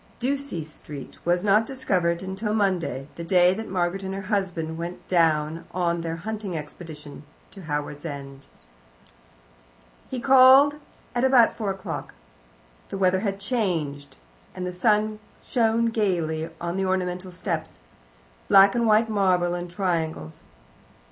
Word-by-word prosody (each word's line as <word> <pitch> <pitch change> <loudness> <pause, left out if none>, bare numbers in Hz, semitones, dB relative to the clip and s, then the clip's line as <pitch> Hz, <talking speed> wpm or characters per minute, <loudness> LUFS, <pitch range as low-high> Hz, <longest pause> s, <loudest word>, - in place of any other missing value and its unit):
Ducie 270 - -2
Street 150 -2 -10
was 175 +1 +1
not 210 +2 +3
discovered 180 -10 0
till 190 0 -5
the 210 +1 -2
Monday, 175 - 0
the 170 - -5
day 180 +1 +4
that 220 +3 -6
Margaret 180 +1 -1
and 190 0 -4
her 195 - -5
husband 175 -5 -1
went 170 +1 -6
down 165 -2 +1
on 170 -2 0
their 165 0 -3
hunting 200 0 -5
expedition 150 -1 -9 0.3
to 195 - -11
Howards 150 -2 -4
End. 140 -3 -8 1.6
He 260 - -3
called 265 +2 +7 0.4
at 245 0 0
about 260 -3 +5
four 215 -3 -3
o'clock. 190 -1 -5 0.7
The - - -4
weather 185 -1 +3
had 200 -1 -2
changed, 175 - -2 0.4
and 180 - -4
the 180 - -4
sun 210 +2 +1 0.3
shone 230 -1 +2
gaily 170 -7 -1
on 170 +2 -3
the 195 - 0
ornamental 185 0 -2
steps 175 - -4 0.7
black 195 0 +7
and 235 -1 +1
white 220 +1 +4
marble 185 -5 +2
in 175 0 -4
triangles. 165 - -3
185 Hz, 140 wpm, -25 LUFS, 165-210 Hz, 1.6 s, called